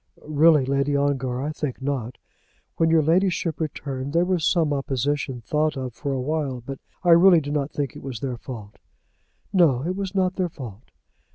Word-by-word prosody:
"Really, 155 Hz, -1 st, +4 dB
Lady 140 Hz, +1 st, +1 dB
Ongar, 135 Hz, -3 st, 0 dB
I 150 Hz, -, -2 dB
think 150 Hz, -4 st, -4 dB
not. 130 Hz, -3 st, -3 dB, 0.6 s
When 165 Hz, -, +3 dB
your 160 Hz, -1 st, +4 dB
ladyship 170 Hz, 0 st, +1 dB
returned 140 Hz, -3 st, -4 dB
there 170 Hz, +1 st, +3 dB
was 180 Hz, -3 st, 0 dB
some 160 Hz, -4 st, +2 dB
opposition 135 Hz, -1 st, -2 dB
thought 150 Hz, +5 st, 0 dB
of 130 Hz, -2 st, -4 dB
for 140 Hz, +3 st, -4 dB
a 135 Hz, -, -1 dB
while, 140 Hz, -1 st, -2 dB
but 135 Hz, 0 st, -6 dB, 0.2 s
I 175 Hz, -, +4 dB
really 170 Hz, +1 st, +7 dB
do 145 Hz, -1 st, -5 dB
not 145 Hz, -1 st, -1 dB
think 145 Hz, -4 st, -3 dB
it -, -, -9 dB
was 130 Hz, -4 st, -6 dB
their 130 Hz, -1 st, -3 dB
fault." 110 Hz, -4 st, -9 dB, 0.7 s
"No; 155 Hz, -9 st, +4 dB
it 180 Hz, +2 st, -1 dB
was 195 Hz, -1 st, -4 dB
not 185 Hz, -1 st, +1 dB
their 185 Hz, -2 st, 0 dB
fault." 120 Hz, -8 st, -10 dB
145 Hz, 185 wpm, -24 LUFS, 130-165 Hz, 0.7 s, really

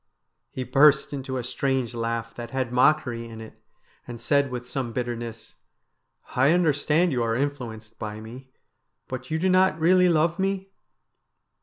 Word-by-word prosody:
He 130 Hz, -, -5 dB
burst 140 Hz, +3 st, +4 dB
into 130 Hz, -1 st, -4 dB
a 125 Hz, -, -3 dB
strange 130 Hz, -1 st, -1 dB
laugh 115 Hz, 0 st, -3 dB
that 120 Hz, -1 st, -7 dB
had 130 Hz, -1 st, -2 dB
mockery 125 Hz, -3 st, +2 dB
in 110 Hz, -1 st, -9 dB
it, 110 Hz, 0 st, -12 dB, 0.5 s
and 120 Hz, -1 st, -7 dB
said 140 Hz, +1 st, +2 dB
with 125 Hz, -1 st, -6 dB
some 125 Hz, -2 st, -3 dB
bitterness: 120 Hz, -2 st, -5 dB, 0.4 s
' -, -, -48 dB
I 135 Hz, +5 st, +4 dB
understand 160 Hz, 0 st, +2 dB
you 125 Hz, -3 st, 0 dB
are 115 Hz, -1 st, 0 dB
influenced 115 Hz, -5 st, -4 dB
by 105 Hz, 0 st, -5 dB
me, 125 Hz, +4 st, -11 dB, 0.6 s
but 130 Hz, 0 st, -6 dB
you 160 Hz, -, 0 dB
do 180 Hz, +4 st, 0 dB
not 185 Hz, -3 st, +3 dB
really 180 Hz, +2 st, +5 dB
love 165 Hz, +1 st, +2 dB
me 195 Hz, 0 st, -1 dB
130 Hz, 160 wpm, -25 LUFS, 115-155 Hz, 0.6 s, really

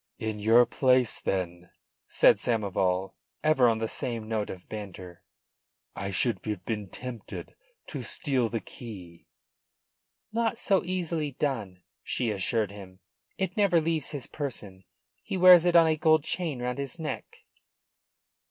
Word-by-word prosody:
"In 110 Hz, -1 st, -3 dB
your 115 Hz, +3 st, +6 dB
place, 130 Hz, -3 st, +2 dB
then," 90 Hz, -2 st, -3 dB, 0.4 s
said -, -, +5 dB
Samoval, 95 Hz, -4 st, 0 dB, 0.3 s
ever 135 Hz, -6 st, +5 dB
on 115 Hz, -, +1 dB
the 110 Hz, 0 st, -2 dB
same 115 Hz, -1 st, -3 dB
note 110 Hz, -2 st, -2 dB
of 90 Hz, -1 st, -9 dB
banter, 95 Hz, -4 st, -8 dB, 0.7 s
"I 100 Hz, -, -4 dB
should 100 Hz, +1 st, 0 dB
have 105 Hz, -4 st, -4 dB
been 105 Hz, -4 st, -3 dB
tempted 125 Hz, -2 st, -8 dB, 0.3 s
to -, -, -6 dB
steal 130 Hz, -6 st, 0 dB
the 115 Hz, -1 st, -3 dB
key." 95 Hz, -8 st, -11 dB, 1.1 s
"Not 230 Hz, 0 st, 0 dB
so 200 Hz, -5 st, +2 dB
easily 170 Hz, -5 st, -2 dB
done," 110 Hz, -11 st, -3 dB, 0.2 s
she 120 Hz, -3 st, -1 dB
assured 105 Hz, +1 st, 0 dB
him. 95 Hz, -2 st, -12 dB, 0.4 s
"It 190 Hz, +3 st, -2 dB
never 200 Hz, -6 st, +4 dB
leaves 160 Hz, -2 st, -1 dB
his 145 Hz, -5 st, -5 dB
person. 105 Hz, -, -6 dB, 0.4 s
He 190 Hz, -, -4 dB
wears 180 Hz, -1 st, +8 dB
it 175 Hz, -1 st, +3 dB
on 165 Hz, -1 st, +8 dB
a 160 Hz, -1 st, +2 dB
gold 155 Hz, -1 st, +4 dB
chain 155 Hz, -8 st, -2 dB
round 125 Hz, +2 st, -2 dB
his 140 Hz, +3 st, -4 dB
neck." 160 Hz, -3 st, -6 dB
120 Hz, 145 wpm, -28 LUFS, 100-155 Hz, 1.1 s, wears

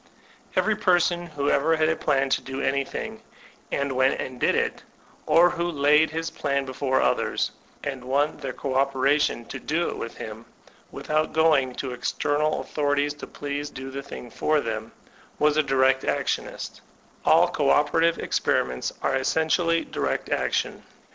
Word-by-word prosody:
Every -, -, +2 dB
person 175 Hz, -1 st, +2 dB
who 145 Hz, -3 st, -1 dB
ever 160 Hz, +4 st, +3 dB
had 155 Hz, 0 st, +2 dB
a 160 Hz, -, +2 dB
plan 135 Hz, -2 st, +1 dB
to -, -, +2 dB
do 135 Hz, 0 st, -6 dB
anything, 140 Hz, 0 st, -2 dB, 0.5 s
and 140 Hz, 0 st, -1 dB
went 130 Hz, +1 st, +2 dB
and 130 Hz, -1 st, -5 dB
did -, -, +2 dB
it, -, -, -1 dB, 0.5 s
or 165 Hz, +3 st, +6 dB
who 170 Hz, +1 st, -2 dB
laid 150 Hz, 0 st, +4 dB
his 165 Hz, +1 st, -3 dB
plan 140 Hz, -1 st, -1 dB
before 130 Hz, 0 st, 0 dB
others, -, -, +1 dB, 0.3 s
and 135 Hz, -3 st, -4 dB
won 145 Hz, +4 st, +1 dB
their 135 Hz, -, -5 dB
co 135 Hz, +1 st, -4 dB
operation 135 Hz, -1 st, +2 dB
to -, -, -7 dB
do 170 Hz, +3 st, -1 dB
it -, -, -5 dB
with 115 Hz, -, -6 dB
him, 110 Hz, +1 st, -8 dB, 0.4 s
without 155 Hz, +1 st, -1 dB
going 150 Hz, -6 st, +3 dB
to 130 Hz, -, -4 dB
external 145 Hz, +4 st, 0 dB
authorities 145 Hz, -1 st, 0 dB
to 145 Hz, -, -9 dB
please 145 Hz, 0 st, -4 dB
do 135 Hz, +1 st, -8 dB
the 140 Hz, +1 st, -5 dB
thing 130 Hz, -3 st, -9 dB
for 155 Hz, +6 st, +1 dB
them, 110 Hz, -3 st, -4 dB, 0.5 s
was 150 Hz, 0 st, +3 dB
a 155 Hz, -, +4 dB
direct 135 Hz, -1 st, +3 dB
actionist -, -, -2 dB, 0.4 s
All -, -, +5 dB
co -, -, 0 dB
operative 165 Hz, +3 st, +3 dB
experi -, -, +1 dB
ments 65 Hz, 0 st, -4 dB
are -, -, +1 dB
essentially 160 Hz, +5 st, +2 dB
direct -, -, -2 dB
action. -, -, -1 dB
145 Hz, 160 wpm, -25 LUFS, 135-155 Hz, 0.5 s, or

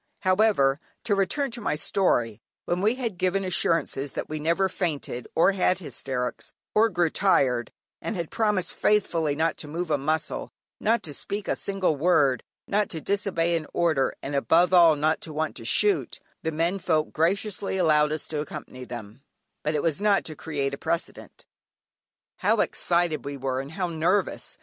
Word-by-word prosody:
However, 185 Hz, -8 st, +3 dB, 0.2 s
to 210 Hz, -, +1 dB
return 235 Hz, +8 st, +1 dB
to 235 Hz, 0 st, -6 dB
my 180 Hz, -, 0 dB
story, 120 Hz, -, +1 dB, 0.2 s
when 175 Hz, +1 st, -1 dB
we 215 Hz, +4 st, +2 dB
had 230 Hz, -8 st, -4 dB
given 185 Hz, +1 st, +1 dB
assurances 165 Hz, -6 st, 0 dB
that -, -, -4 dB
we 155 Hz, 0 st, -3 dB
never 170 Hz, +5 st, +2 dB
fainted, 150 Hz, -9 st, -3 dB
nor 165 Hz, +4 st, +5 dB
had 185 Hz, -1 st, +2 dB
hysterics, 130 Hz, -7 st, -4 dB, 0.2 s
nor 225 Hz, +2 st, +5 dB
grew 175 Hz, -4 st, +1 dB
tired; 125 Hz, -, +2 dB, 0.3 s
and -, -, -3 dB
had 170 Hz, -3 st, -4 dB
promised 210 Hz, -5 st, 0 dB
faithfully 165 Hz, -8 st, +1 dB
not 160 Hz, +2 st, 0 dB
to 150 Hz, -, -5 dB
move 165 Hz, +2 st, -4 dB
a 145 Hz, -, +2 dB
muscle, 155 Hz, +3 st, -2 dB, 0.3 s
not 230 Hz, +2 st, +1 dB
to 150 Hz, -, -6 dB
speak 200 Hz, +7 st, -5 dB
a -, -, +1 dB
single 195 Hz, -5 st, 0 dB
word, 140 Hz, -5 st, +3 dB, 0.3 s
not 205 Hz, 0 st, +1 dB
to 160 Hz, -, -4 dB
disobey 175 Hz, -2 st, 0 dB
an 160 Hz, -2 st, -3 dB
order, 155 Hz, -6 st, +2 dB
and 140 Hz, -, -4 dB
above 165 Hz, +6 st, +3 dB
all 170 Hz, -3 st, +7 dB
not 155 Hz, +2 st, +1 dB
to 160 Hz, -, -7 dB
want 155 Hz, +1 st, -2 dB
to -, -, -8 dB
shoot, 415 Hz, -2 st, +2 dB, 0.2 s
the 160 Hz, -, -2 dB
men 170 Hz, +5 st, 0 dB
folk 155 Hz, -4 st, 0 dB
graciously 195 Hz, +4 st, 0 dB
allowed 150 Hz, -4 st, +3 dB
us 155 Hz, -, -3 dB
to 150 Hz, -2 st, -2 dB
accompany 130 Hz, -3 st, -8 dB
them; 120 Hz, 0 st, -9 dB, 0.4 s
but 150 Hz, +1 st, 0 dB
it 150 Hz, -, 0 dB
was 165 Hz, +2 st, 0 dB
not 205 Hz, -1 st, +3 dB
to 155 Hz, -, -5 dB
create 140 Hz, -3 st, -3 dB
a 140 Hz, -, -5 dB
precedent. 170 Hz, -, -4 dB, 0.9 s
How -, -, +2 dB
excited 170 Hz, -3 st, +1 dB
we 140 Hz, 0 st, -5 dB
were 130 Hz, 0 st, -2 dB
and 140 Hz, +3 st, -9 dB
how 185 Hz, 0 st, -1 dB
nervous! 175 Hz, +5 st, 0 dB
165 Hz, 180 wpm, -26 LUFS, 150-190 Hz, 0.9 s, all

